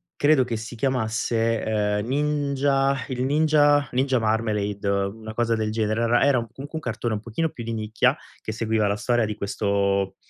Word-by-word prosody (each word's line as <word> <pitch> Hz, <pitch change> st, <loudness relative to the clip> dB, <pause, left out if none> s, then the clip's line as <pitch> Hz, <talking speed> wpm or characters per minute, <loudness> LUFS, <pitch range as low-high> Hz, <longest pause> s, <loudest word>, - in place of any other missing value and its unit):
credo 145 Hz, -2 st, +4 dB
che 125 Hz, -2 st, -3 dB
si 115 Hz, +2 st, -8 dB
chiamasse, 115 Hz, -2 st, 0 dB
ehm, 105 Hz, -1 st, 0 dB
Ninja 140 Hz, -1 st, +1 dB
il 125 Hz, -1 st, -2 dB
Ninja 145 Hz, -1 st, +3 dB
Ninja 130 Hz, 0 st, +1 dB
Marmelade, 105 Hz, -2 st, -1 dB
una 100 Hz, +3 st, -2 dB
cosa 115 Hz, 0 st, +1 dB
del 110 Hz, -1 st, -1 dB
genere. 110 Hz, 0 st, 0 dB
Era 115 Hz, +1 st, +3 dB
era 140 Hz, -1 st, +4 dB
comunque 135 Hz, +5 st, -8 dB
un 160 Hz, -, -2 dB
cartone 120 Hz, -4 st, -3 dB
un -, -, -3 dB
pochino 120 Hz, +9 st, -2 dB
più 120 Hz, -, -8 dB
di 115 Hz, 0 st, -4 dB
nicchia 110 Hz, 0 st, +1 dB, 0.3 s
che -, -, -5 dB
seguiva 110 Hz, -1 st, 0 dB
la 100 Hz, +1 st, 0 dB
storia 120 Hz, 0 st, +1 dB
di 105 Hz, -, -3 dB
questo, 100 Hz, -1 st, 0 dB
115 Hz, 175 wpm, -24 LUFS, 110-135 Hz, 0.3 s, credo